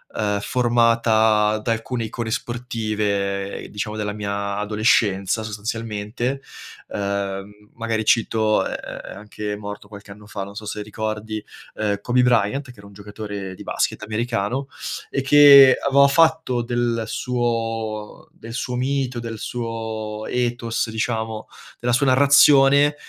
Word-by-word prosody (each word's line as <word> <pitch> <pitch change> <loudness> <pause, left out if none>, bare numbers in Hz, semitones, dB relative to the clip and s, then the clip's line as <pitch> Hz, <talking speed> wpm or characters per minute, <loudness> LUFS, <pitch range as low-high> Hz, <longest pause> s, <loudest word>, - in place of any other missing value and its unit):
uhm, 105 -1 0
formata 115 -3 +3
da 115 +2 -2
alcune 115 +1 -3
icone 110 +1 -4
sportive, 105 -5 -2
diciamo 105 +1 -4
della 105 -1 -2
mia 100 -1 -3
adolescenza 105 -1 +1
sostanzialmente. 110 +4 -4 0.5
Uhm, 100 +1 -4
magari 115 -2 -2
cito, 110 -2 +2
è - - -3
è - - -7
è - - -8
anche 105 +1 -6
morto 105 0 -8
qualche 100 -1 -12
anno 105 +1 -13
fa, 100 -2 -5
non 100 +1 -10
so 105 - -7
se 105 0 -4
ricordi, 110 0 -4 0.3
uhm, 105 -2 -1
Kobe 125 +3 +2
Bryant, 125 +3 +2
che 120 - -20
era 100 0 -13
un 100 - -15
giocatore 105 -1 -7
di - - -10
basket - - -1
americano, 115 +4 -2 0.4
e 135 - 0
che 140 -1 +8
aveva 140 0 +6
fatto 160 -5 +3
del 120 -1 -1
suo 115 -3 -3
del 115 +1 -11
suo 125 +1 -3
mito, 130 -1 -1
del 115 -1 -6
suo 110 -2 -5
ethos, 120 -2 -1
diciamo, 110 -1 -3 0.3
della 120 0 0
sua 140 +3 +3
narrazione, 140 +1 +6
110 Hz, 135 wpm, -22 LUFS, 105-120 Hz, 0.5 s, che